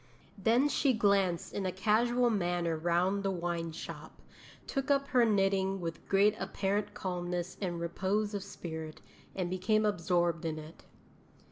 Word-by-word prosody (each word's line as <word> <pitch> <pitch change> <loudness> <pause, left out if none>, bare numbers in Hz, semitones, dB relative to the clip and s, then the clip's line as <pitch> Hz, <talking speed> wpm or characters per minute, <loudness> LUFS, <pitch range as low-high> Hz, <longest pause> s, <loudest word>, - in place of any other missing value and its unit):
Then 230 +7 +3
she 280 -2 +2
glanced 195 -5 +2
in 195 -2 -2
a - - -1
casual 235 +5 +2
manner 175 -4 0
round 175 +5 +1
the 195 - 0
wine 170 -2 -2
shop, 160 - -9 0.5
took 275 +1 -3
up 280 0 +2
her 250 -2 +4
knitting 195 -2 +2
with 165 -2 -6
great 200 +2 +4
apparent 205 +1 -1
calmness 180 -1 -3
and 175 -3 -2
repose 195 +5 -1
of 200 - -2
spirit, 160 -4 -7 0.4
and 185 -2 -1
became 215 +4 +1
absorbed 175 -4 +1
in 160 -1 -2
it.' 155 +1 -11
190 Hz, 145 wpm, -32 LUFS, 175-210 Hz, 0.5 s, her